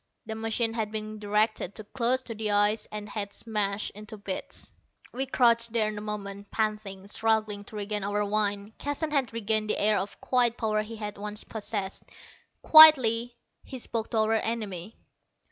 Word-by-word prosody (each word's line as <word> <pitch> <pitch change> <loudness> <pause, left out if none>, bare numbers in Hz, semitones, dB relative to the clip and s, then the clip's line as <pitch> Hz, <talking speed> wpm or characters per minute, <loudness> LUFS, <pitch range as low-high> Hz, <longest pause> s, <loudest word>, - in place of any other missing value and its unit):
The 220 - -5
machine 225 +1 -1
had 220 -2 -3
been 215 0 -5
directed 210 -2 0
too 215 - -6
close 250 +4 0
to 230 - -7
the 215 -1 -3
ice 205 +1 +2
and 210 0 -6
had 205 -1 -4
smashed 210 -2 -1
into 215 +1 -10
bits. 200 -2 -5 0.4
We 265 +2 -2
crouched 235 -3 +3
there 215 -2 +1
a 210 - -6
moment, 205 -1 -6
panting, 210 -3 -3
struggling 215 -1 0
to 215 - -12
regain 210 0 -3
our 205 +1 -1
wind. 205 0 -1
Keston 290 +2 -3
had 275 -5 +1
regained 220 -1 0
the - - +1
air 210 0 +3
of 200 - -6
quiet 245 -2 +2
power 215 -2 0
he 220 +2 -8
had 210 -2 -6
once 210 +1 -3
possessed. 205 -3 -4 0.6
Quietly 245 -7 +8 0.3
he 260 - -8
spoke 230 -2 -3
to 230 - -2
our 220 0 +2
enemy. 215 -4 -3
215 Hz, 170 wpm, -27 LUFS, 205-230 Hz, 0.6 s, Quietly